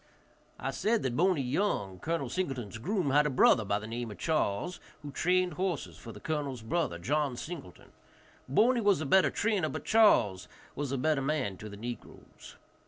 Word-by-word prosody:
I -, -, -3 dB
said 225 Hz, +1 st, 0 dB
that 125 Hz, -2 st, -1 dB
Boney 175 Hz, -2 st, +2 dB
Young, 125 Hz, -, -1 dB
Col. 165 Hz, +1 st, -2 dB
Singleton's 130 Hz, -, -3 dB
groom, 180 Hz, -, -1 dB
had 150 Hz, +2 st, +4 dB
a -, -, 0 dB
brother 130 Hz, -3 st, +5 dB
by 100 Hz, 0 st, 0 dB
the 105 Hz, -, -7 dB
name 115 Hz, +1 st, -4 dB
of 105 Hz, -, -9 dB
Charles, 155 Hz, -, -1 dB, 0.2 s
who 145 Hz, -, -6 dB
trained 180 Hz, +3 st, +1 dB
horses 180 Hz, -1 st, -2 dB
for 115 Hz, -, -9 dB
the -, -, -11 dB
colonel's 140 Hz, -6 st, -3 dB
brother, 135 Hz, -, -1 dB
John 140 Hz, -, -1 dB
Singleton, 150 Hz, -, -8 dB, 0.6 s
Boney 235 Hz, -, +4 dB
was 205 Hz, -5 st, +3 dB
a 155 Hz, -, -3 dB
better 190 Hz, +7 st, +4 dB
trainer, 205 Hz, -8 st, 0 dB
but 155 Hz, -2 st, -6 dB
Charles 105 Hz, -, +4 dB, 0.3 s
was 145 Hz, -2 st, -3 dB
a 135 Hz, -, -1 dB
better 150 Hz, +1 st, +1 dB
man 135 Hz, -8 st, -1 dB
to 105 Hz, -, -8 dB
the 100 Hz, -, -9 dB
negroes. 120 Hz, +1 st, -9 dB
145 Hz, 180 wpm, -30 LUFS, 115-180 Hz, 0.6 s, brother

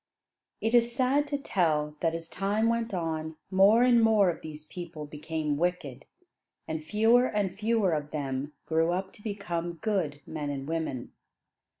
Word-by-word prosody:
It 225 Hz, -, 0 dB
is 235 Hz, 0 st, +4 dB
sad 270 Hz, +3 st, +2 dB
to 285 Hz, -, -1 dB
tell 155 Hz, -, 0 dB
that 165 Hz, -1 st, 0 dB
as 165 Hz, 0 st, -6 dB
time 205 Hz, +6 st, 0 dB
went 230 Hz, 0 st, 0 dB
on 160 Hz, -3 st, -3 dB, 0.2 s
more 200 Hz, +5 st, +6 dB
and 245 Hz, -2 st, +5 dB
more 215 Hz, -5 st, +5 dB
of -, -, -9 dB
these 155 Hz, -1 st, -9 dB
people 165 Hz, -2 st, -7 dB
became 150 Hz, 0 st, -3 dB
wicked, 150 Hz, -6 st, -2 dB, 0.6 s
and 160 Hz, -1 st, -3 dB
fewer 225 Hz, +7 st, +4 dB
and 200 Hz, -3 st, -1 dB
fewer 215 Hz, -2 st, +1 dB
of 150 Hz, -1 st, -2 dB
them 140 Hz, -1 st, -3 dB
grew 165 Hz, +1 st, +2 dB
up 190 Hz, +1 st, -3 dB
to -, -, -16 dB
become 175 Hz, -5 st, -3 dB
good 170 Hz, -6 st, -1 dB
men 150 Hz, -2 st, -4 dB
and 140 Hz, -1 st, -4 dB
women. 160 Hz, -6 st, -3 dB
175 Hz, 165 wpm, -29 LUFS, 155-215 Hz, 0.6 s, more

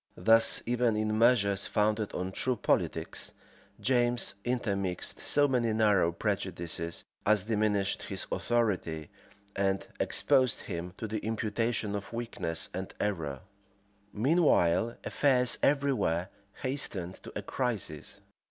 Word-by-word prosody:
Thus, 115 Hz, 0 st, +5 dB
even 120 Hz, -1 st, +1 dB
in 110 Hz, 0 st, 0 dB
measures 100 Hz, -5 st, +3 dB
founded 105 Hz, 0 st, +1 dB
on 90 Hz, +1 st, -3 dB
true 130 Hz, +6 st, 0 dB
politics, -, -, -1 dB, 0.5 s
James 120 Hz, -1 st, +1 dB
intermixed 100 Hz, -7 st, -2 dB
so 145 Hz, 0 st, +3 dB
many 120 Hz, -4 st, +1 dB
narrow 105 Hz, -6 st, +3 dB
prejudices, 85 Hz, -3 st, -3 dB, 0.2 s
as 105 Hz, -2 st, +3 dB
diminished 105 Hz, -2 st, 0 dB
his -, -, -5 dB
authority, 95 Hz, -10 st, -1 dB, 0.4 s
and 95 Hz, 0 st, 0 dB
exposed 130 Hz, -3 st, +2 dB
him 85 Hz, +2 st, -6 dB
to 110 Hz, -, -4 dB
the 110 Hz, 0 st, -3 dB
imputation 110 Hz, 0 st, -1 dB
of 100 Hz, +2 st, -5 dB
weakness 115 Hz, -8 st, -2 dB
and 95 Hz, +1 st, -4 dB
of -, -, -32 dB
error. 80 Hz, -9 st, -2 dB, 0.7 s
{1620.} 105 Hz, -, -5 dB
Meanwhile 115 Hz, -, +3 dB
affairs 125 Hz, -4 st, +2 dB
every 140 Hz, -1 st, +3 dB
where 85 Hz, -5 st, -1 dB, 0.3 s
hastened 115 Hz, -10 st, -1 dB
to -, -, -10 dB
a -, -, -4 dB
crisis. 110 Hz, -, -3 dB
110 Hz, 125 wpm, -30 LUFS, 95-120 Hz, 0.7 s, Thus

